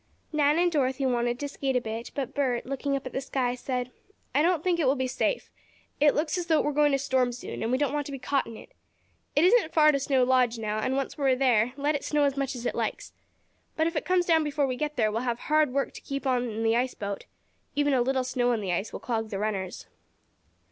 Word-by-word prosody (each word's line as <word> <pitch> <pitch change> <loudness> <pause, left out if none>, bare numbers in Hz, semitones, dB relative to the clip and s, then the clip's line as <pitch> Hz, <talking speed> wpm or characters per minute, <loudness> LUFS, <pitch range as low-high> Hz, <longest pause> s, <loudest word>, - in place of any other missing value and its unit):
Nan 295 0 +3
and 350 0 +3
Dorothy 270 -3 0
wanted 240 -1 +1
to 285 - -2
skate 275 -1 -2
a - - +4
bit, 225 0 -5
but 270 -4 -3
Bert 255 -4 0
looking 275 +2 -2
up 275 - -4
at 255 - -6
the 265 - -2
sky, 255 -2 -1
said: 250 0 -3 0.4
"I - - +3
don't 335 -1 +2
think 355 -2 +1
it 300 - +2
will 265 - +4
be 260 -1 -1
safe. 260 - -1 0.5
It 295 -1 +5
looks 310 +4 0
as 345 - -4
though 320 -2 +4
it - - +1
were 295 - 0
going 295 0 +4
to - - +4
storm 260 -2 +1
soon, 240 - -7
and 225 - -1
we 255 - +2
don't 290 0 0
want 295 -1 -2
to - - -7
be 275 - -4
caught 275 +1 -1
in 230 - -9
it. - - -14 0.6
It 295 +4 +5
isn't 395 -4 +4
far 305 -1 +7
to 280 - 0
Snow 270 -1 +2
Lodge 250 -2 +3
now, 215 -1 -2
and 260 +4 -1
once 275 +2 -3
we 280 - 0
are - - +3
there 250 -3 +2
let 290 +2 +1
it 285 - -3
snow 295 -1 +1
as 280 -1 +2
much 275 -1 -2
as 245 0 -7
it - - 0
likes. - - -3 0.6
But 320 - +1
if 335 +1 -1
it 300 - 0
comes 365 -1 +2
down 325 -2 +4
before 290 -1 0
we 255 -2 -2
get 300 +3 -3
there 215 -3 +2
we'll 225 +2 -1
have 240 -2 -1
hard 305 +1 +2
work 275 +1 -1
to - - -10
keep 275 0 -5
on 250 -2 +1
in 225 +1 -3
the 225 0 +3
ice 250 +2 0
boat. 200 -1 -5 0.5
Even 290 -1 +2
a 255 - +3
little 260 +1 +1
snow 245 -1 +1
on 230 - 0
the 185 -3 -1
ice 195 +5 -2
will - - -6
clog 225 -2 -2
the 200 - -4
runners." 195 -3 -3
265 Hz, 270 wpm, -27 LUFS, 245-290 Hz, 0.6 s, far